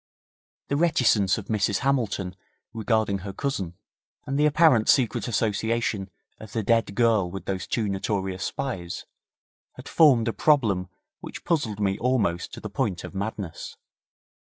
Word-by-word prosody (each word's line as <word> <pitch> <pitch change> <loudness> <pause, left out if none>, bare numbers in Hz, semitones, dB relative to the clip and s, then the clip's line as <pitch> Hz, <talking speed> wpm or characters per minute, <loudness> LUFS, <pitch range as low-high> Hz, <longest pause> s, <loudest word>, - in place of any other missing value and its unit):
The 140 - +1
reticence 125 - +3
of 105 - -6
Mrs 105 -2 0
Hamilton 110 -9 0 0.4
regarding 110 -3 0
her 100 +1 -6
cousin, 95 -7 -3 0.5
and 135 +1 -2
the 150 - +5
apparent 150 -7 +4
secret 130 -1 +3
association 110 -2 -1 0.3
of 110 -1 -11
the 110 - -1
dead 115 -2 +1
girl 110 -5 +3
with 95 +2 -7
those 95 -1 -3
two 110 -3 -1
notorious 95 -1 -2
spies, 95 -11 -4 0.7
had - - -12
formed 130 -8 +5
a 115 - 0
problem 105 -12 +2 0.3
which - - -9
puzzled 130 - 0
me 95 -2 0
almost 115 -9 0
to - - -7
the - - -6
point 105 -4 -2
of - - -8
madness. 100 -3 -5
110 Hz, 145 wpm, -25 LUFS, 95-125 Hz, 0.7 s, the